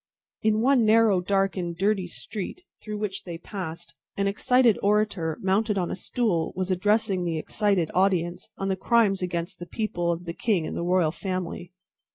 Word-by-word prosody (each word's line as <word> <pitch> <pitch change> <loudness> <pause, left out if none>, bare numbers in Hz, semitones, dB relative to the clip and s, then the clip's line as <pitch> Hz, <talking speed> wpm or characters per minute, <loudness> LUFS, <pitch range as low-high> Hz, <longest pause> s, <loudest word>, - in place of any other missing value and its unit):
In 215 0 +2
one 260 0 +4
narrow, 215 -3 +4
dark, 195 +1 +1
and 170 -2 -3
dirty 195 -1 +1
street 210 - -6 0.2
through 210 -1 -5
which 205 -2 -4
they 170 -2 -6
passed, 165 -5 -7 0.2
an 200 - +1
excited 235 +3 +3
orator, 200 -6 +1
mounted 205 +2 +1
on 180 -2 -1
a - - -2
stool, 185 -4 -1
was 185 +1 -2
addressing 195 -1 +1
an 165 - -1
excited 195 0 0
audience 180 -2 +1
on 195 - -2
the 190 - +1
crimes 200 -1 +2
against 175 0 -3
the 175 - -7
people, 175 -6 -1
of 170 +1 -4
the 170 - -4
king 190 -4 0
and - - -5
the - - -2
royal 175 -2 +2
family. 180 -1 -4
190 Hz, 180 wpm, -26 LUFS, 175-210 Hz, 0.2 s, one